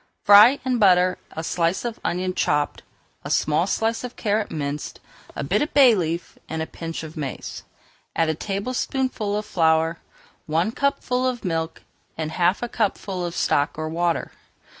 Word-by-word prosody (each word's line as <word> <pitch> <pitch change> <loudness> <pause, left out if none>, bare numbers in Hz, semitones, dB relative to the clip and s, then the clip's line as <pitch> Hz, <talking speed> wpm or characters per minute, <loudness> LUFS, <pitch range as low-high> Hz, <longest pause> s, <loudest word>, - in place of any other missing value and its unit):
Fry 210 +7 +8
in 250 -2 +1
butter 185 -3 +4
a 160 - -5
slice 170 +5 0
of 235 -1 -4
onion 185 +1 -1
chopped, 145 -4 0 0.4
a - - -6
small 155 +4 +2
slice 225 +4 0
of 250 -1 -6
carrot 215 -1 0
minced, 145 -1 -4 0.4
a - - -3
bit - - +1
of 295 - -2
bay 265 -5 +8
leaf, 170 -3 -3
and 160 - -3
a 160 - -1
pinch 165 0 -6
of 160 0 -9
mace. 140 -5 -6 0.5
Add 165 - +2
a 160 - +1
tablespoonful 210 - -2
of 210 - -3
flour, 165 -3 +2 0.5
one 165 +7 +1
cupful 255 -1 0
of 245 -4 -3
milk, 165 -2 -2 0.3
and 155 -1 -3
half 175 +6 +1
a - - -1
cupful 200 -5 -2
of 175 0 -4
stock 145 +1 +1
or 155 0 -3
water. 170 +1 -1
180 Hz, 165 wpm, -23 LUFS, 160-220 Hz, 0.5 s, Fry